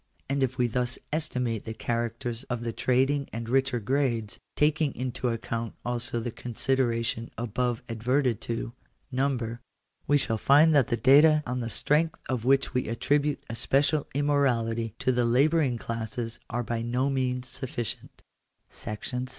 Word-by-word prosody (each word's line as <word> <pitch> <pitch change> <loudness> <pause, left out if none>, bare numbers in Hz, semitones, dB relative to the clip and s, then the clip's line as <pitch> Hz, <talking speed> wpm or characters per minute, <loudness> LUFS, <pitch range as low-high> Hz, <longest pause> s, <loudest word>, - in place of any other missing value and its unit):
And 140 0 0
if 130 -1 0
we 125 - +3
thus 125 +1 -1 0.2
estimate 125 -8 -1
the 110 - -5
characters 120 +1 -2
of 120 -1 -3
the 115 -1 -3
trading 135 +4 +1
and 115 0 -5
richer 130 0 +2
grades, 120 -2 -1 0.2
taking 150 -1 +2
into 125 0 -2
account 115 0 -3
also 120 -1 -2
the 120 +1 -3
consideration 115 -1 -1
above 120 +1 -1
adverted 120 +1 0
to 115 0 -3 0.2
— - - -43
number 120 -4 -1 0.2
— - - -42
we 145 - +5
shall 115 -5 -1
find 150 +6 +6
that 140 -3 +4
the 120 -3 0
data 150 +6 +6
on 125 +1 -2
the 115 -1 -3
strength 160 +7 +1
of 125 -3 -2
which 135 0 +3
we 125 - 0
attribute 145 +6 0
especial 140 +6 +1
immo 145 +1 +2
rality 115 -5 +1
to 130 - +1
the 125 -1 +1
labouring 135 +2 +3
classes 115 +1 -4
are 120 0 -1
by 115 0 -2
no 125 +3 0
means 125 -1 -1
sufficient 120 -3 -5 0.5
§ - - -18
6. 105 +4 -5
125 Hz, 160 wpm, -28 LUFS, 115-135 Hz, 0.5 s, find